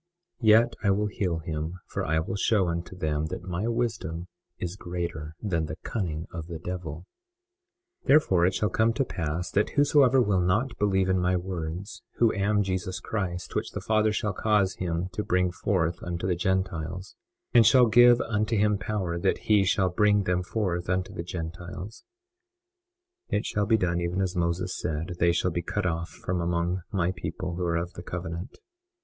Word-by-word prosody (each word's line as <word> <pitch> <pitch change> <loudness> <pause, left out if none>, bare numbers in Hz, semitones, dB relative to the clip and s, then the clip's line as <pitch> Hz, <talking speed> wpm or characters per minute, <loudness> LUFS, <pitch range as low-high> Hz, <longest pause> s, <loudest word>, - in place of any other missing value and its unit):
Yet 115 +1 +5
I 100 - +3
will 100 +2 +2
heal 95 -5 -1
him, 80 +1 -3
for - - -4
I 80 0 +1
will 90 - -4
show 100 -2 +2
unto 85 +2 -4
them 75 -3 -1
that 90 +1 -6
my 90 +4 -2
wisdom 105 -8 -2 0.3
is 90 0 -4
greater 85 -5 -5
than 85 -7 -1
the - - -5
cunning 80 -7 -3
of 80 -1 -6
the 85 -2 -5
devil. 85 -1 -6 1.0
21:11 - - -18
Therefore 95 - +5
it 95 - 0
shall 105 - +1
come 110 +3 +2
to 135 +4 0
pass 85 -2 -3
that 105 - +2
whosoever 140 -3 +5
will 100 -6 +3
not 105 +9 +1
believe 95 -2 +2
in 95 0 +2
my 90 0 +2
words, 90 +2 -5
who 115 -2 +3
am 105 +1 +2
Jesus 95 -1 -2
Christ, 90 -5 -4
which - - -2
the - - -3
Father 110 0 +2
shall 105 -1 -1
cause 100 -2 +2
him 85 0 -2
to 105 - -2
bring 90 -1 +1
forth 85 -2 0
unto 85 0 -4
the 95 - +2
Gentiles, 90 -1 -2 0.4
and 120 - +8
shall 125 +3 +6
give 120 +1 +7
unto 110 0 0
him 105 -1 +2
power 95 -6 -2
that 95 +2 +1
he 105 -2 +4
shall 95 0 +2
bring 105 +2 +3
them 90 -1 +1
forth 90 -3 -2
unto 90 0 -1
the - - -4
Gentiles, 90 +4 -7 1.3
(it 105 - 0
shall 105 -1 0
be 110 0 +4
done 85 -3 0
even 85 +2 -1
as 95 -1 -1
Moses 85 +1 -1
said) 85 +2 -3
they 85 0 +4
shall 90 +1 +1
be 85 - -1
cut 105 +3 -2
off 85 0 -1
from 90 -1 -3
among 85 +2 0
my 90 -3 +1
people 90 0 -5
who 90 +1 -3
are 85 -1 +1
of 85 +1 -3
the - - -8
covenant. 85 0 -6
90 Hz, 185 wpm, -27 LUFS, 85-105 Hz, 1.3 s, and